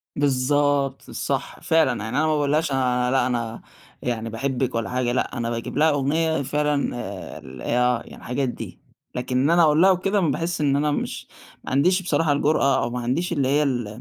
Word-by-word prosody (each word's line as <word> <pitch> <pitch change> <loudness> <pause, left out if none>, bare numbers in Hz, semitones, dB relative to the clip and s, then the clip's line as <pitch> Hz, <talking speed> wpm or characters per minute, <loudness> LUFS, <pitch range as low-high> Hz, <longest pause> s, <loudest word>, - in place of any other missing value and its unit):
بالضبط، 140 0 +1
صح - - -3
فعلًا 135 -9 +2
يعني 110 - -3
أنا 155 - +3
ما 155 - +2
باقول 145 -1 0
لهاش 155 0 +1
أنا 125 -2 +1
لأ، 130 -2 +2
أنا 115 -2 -3 0.4
يعني 115 -2 -2
باحبك 130 +2 -2
ولا 115 0 -1
حاجة، 125 -1 0
لأ، 125 0 -1
أنا 115 0 -2
باجيب 115 +2 -4
لها 155 +2 +5
أغنية 155 +2 +1
فعلًا 145 0 0
آآ 100 -5 -7
ال 65 -1 -11
آه، 125 - +1
يعني - - -12
الحاجات 130 +1 -2
دي، - - -8 0.4
لكن 125 0 -2
إن 140 - +2
أنا 170 +1 +5
أقول 155 +1 +4
لها 190 - +7
وكده، 195 +3 +1
باحِسّ 165 0 -1
إن 140 -2 +2
أنا 150 +1 +1
مش - - -3 0.4
ما - - -7
عنديش 180 +8 +3
بصراحة 165 -4 +1
الجرأة، 140 -2 +2
أو 120 - -1
ما 125 +1 -4
عنديش 135 +10 -1
اللي 140 -5 +1
هي 145 +3 +3
ال 125 -6 -1
135 Hz, 200 wpm, -23 LUFS, 125-150 Hz, 0.4 s, لها